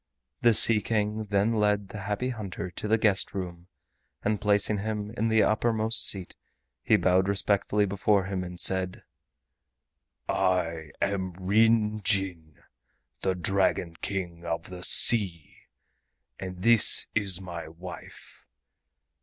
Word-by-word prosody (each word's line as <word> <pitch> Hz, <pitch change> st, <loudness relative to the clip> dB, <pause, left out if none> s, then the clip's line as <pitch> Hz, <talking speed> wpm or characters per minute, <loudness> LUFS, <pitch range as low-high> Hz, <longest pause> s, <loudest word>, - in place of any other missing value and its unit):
The 120 Hz, -2 st, +4 dB
Sea 110 Hz, 0 st, +6 dB
King 105 Hz, 0 st, -2 dB
then 100 Hz, +2 st, 0 dB
led 105 Hz, -2 st, 0 dB
the 105 Hz, -, -8 dB
Happy 105 Hz, +6 st, -3 dB
Hunter 100 Hz, -6 st, -6 dB
to 105 Hz, -, -5 dB
the 110 Hz, +1 st, +3 dB
guest 105 Hz, -2 st, +1 dB
room, 90 Hz, -2 st, -6 dB, 0.6 s
and 105 Hz, 0 st, -1 dB
placing 105 Hz, 0 st, +2 dB
him 105 Hz, 0 st, -4 dB
in 115 Hz, -1 st, -1 dB
the 110 Hz, -1 st, +3 dB
uppermost 110 Hz, 0 st, +2 dB
seat, 95 Hz, -3 st, -3 dB, 0.5 s
he -, -, +3 dB
bowed 95 Hz, +1 st, +2 dB
respectfully 100 Hz, +1 st, +1 dB
before 100 Hz, 0 st, +1 dB
him, 95 Hz, -1 st, -3 dB
and 90 Hz, -1 st, -8 dB
said: 95 Hz, -1 st, 0 dB, 1.2 s
"I 85 Hz, -4 st, -1 dB
am 95 Hz, -2 st, -2 dB
Ryn 105 Hz, +3 st, +2 dB
Jin, 90 Hz, -6 st, -2 dB, 0.6 s
the 95 Hz, -1 st, 0 dB
Dragon 90 Hz, -2 st, 0 dB
King 90 Hz, -4 st, -5 dB
of 85 Hz, +1 st, -5 dB
the 90 Hz, -1 st, -8 dB
Sea, 90 Hz, -6 st, +2 dB, 0.8 s
and 90 Hz, -1 st, -7 dB
this 115 Hz, -1 st, +6 dB
is 100 Hz, -4 st, -1 dB
my 85 Hz, -4 st, -8 dB
wife. 90 Hz, +3 st, -12 dB
100 Hz, 130 wpm, -27 LUFS, 90-105 Hz, 1.2 s, Sea